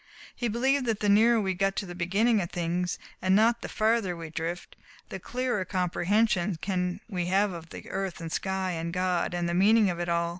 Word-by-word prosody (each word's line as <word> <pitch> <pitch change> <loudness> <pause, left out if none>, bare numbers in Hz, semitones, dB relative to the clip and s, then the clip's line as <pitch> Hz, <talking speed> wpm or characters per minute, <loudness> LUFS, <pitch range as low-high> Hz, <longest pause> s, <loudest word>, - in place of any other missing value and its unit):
He 240 - -2
believed 255 +4 +1
that 220 -2 0
the 205 - +1
nearer 225 +3 +5
we 190 -3 0
get 195 +1 0
to 205 - -2
the 175 - -7
beginning 200 +6 +2
of 170 - -4
things, 175 0 -2 0.2
and 185 +1 +3
not 230 +3 +3
the - - -6
farther 215 -5 +1
we 165 -1 -8
drift, 165 +2 -5 0.3
the 190 - -6
clearer 245 -1 -2
comprehension 185 +1 +1
can 180 0 -2
we 180 -5 -3
have 195 +2 +2
of 165 -2 -8 0.2
earth 190 -1 -4
and 165 -1 -6
sky 190 0 -1
and 165 0 -3
God, 180 0 0
and 175 0 -1
the 170 - -1
meaning 205 +2 +4
of 175 - -6
it 175 0 -2
all. 170 0 +1
190 Hz, 210 wpm, -28 LUFS, 175-215 Hz, 0.3 s, nearer